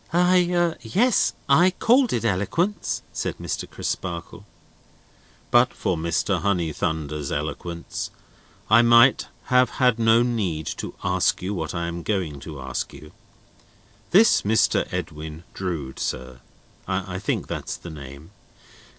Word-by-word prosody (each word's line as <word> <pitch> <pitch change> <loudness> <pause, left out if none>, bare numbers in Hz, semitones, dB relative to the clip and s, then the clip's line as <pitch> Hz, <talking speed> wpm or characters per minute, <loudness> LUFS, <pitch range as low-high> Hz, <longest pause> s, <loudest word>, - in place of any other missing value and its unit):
"I—yes, 180 +5 +2
I 175 +3 +6
called 240 +6 +3
it 115 - -1
eloquence," 115 - -1
said - - -3
Mr. - - -4
Crisparkle. 85 -2 -5 1.1
"But 120 +1 +4
for 95 -4 -1
Mr. 85 +2 0
Honeythunder's 80 -5 -1
eloquence, 80 +3 -4 0.6
I 110 +2 +6
might 120 +2 +5 0.3
have 125 0 +5
had 125 -3 +3
no 115 +1 +5
need 100 -11 -1
to - - -6
ask - - +1
you 95 +3 -2
what 85 -2 -4
I 85 -1 -2
am 85 0 -4
going 85 -7 -2
to 75 0 -9
ask - - -4
you. 75 - -12 1.0
This 215 +6 +5
Mr. 110 +2 +2
Edwin 80 -2 -5
Drood, 80 -9 -4
sir: 65 0 -4 0.5
I - - -2
think - - -2
that's - - -5
the 85 - -9
name?" 70 +3 -11
95 Hz, 125 wpm, -24 LUFS, 80-125 Hz, 1.1 s, I